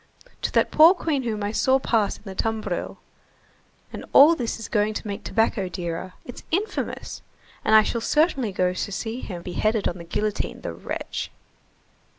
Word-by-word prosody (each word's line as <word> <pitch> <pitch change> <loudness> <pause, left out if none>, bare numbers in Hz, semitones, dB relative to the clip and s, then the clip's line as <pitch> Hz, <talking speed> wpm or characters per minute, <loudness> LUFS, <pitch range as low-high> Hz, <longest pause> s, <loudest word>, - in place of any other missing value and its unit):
to - - -1
that - - +2
poor 325 +5 +7
queen 310 -6 -1
whom 220 -4 -3
I 205 - -1
saw 260 +4 +3
pass 225 -5 0
in - - -22
the 195 -3 -7
tumbril! 220 +3 -2 1.0
And - - -6
all 295 +4 +9
this 240 -7 -3
is 225 - -6
going 210 0 +1
to - - -5
make 200 +1 -5
tobacco 220 -4 0
dearer. 175 +1 -5
It's 245 - -9
infamous! 395 +6 -3 0.4
And 220 - +4
I 215 - +8
shall 235 +2 -2
certainly 275 - +2
go 180 -1 +1
to 185 - -3
see 225 +4 -4
him 180 -8 -7
beheaded 215 +4 0
on 175 - -4
the - - -7
guillotine, 210 +5 -2
the - - -5
wretch!" - - -5
215 Hz, 175 wpm, -24 LUFS, 195-250 Hz, 1.0 s, all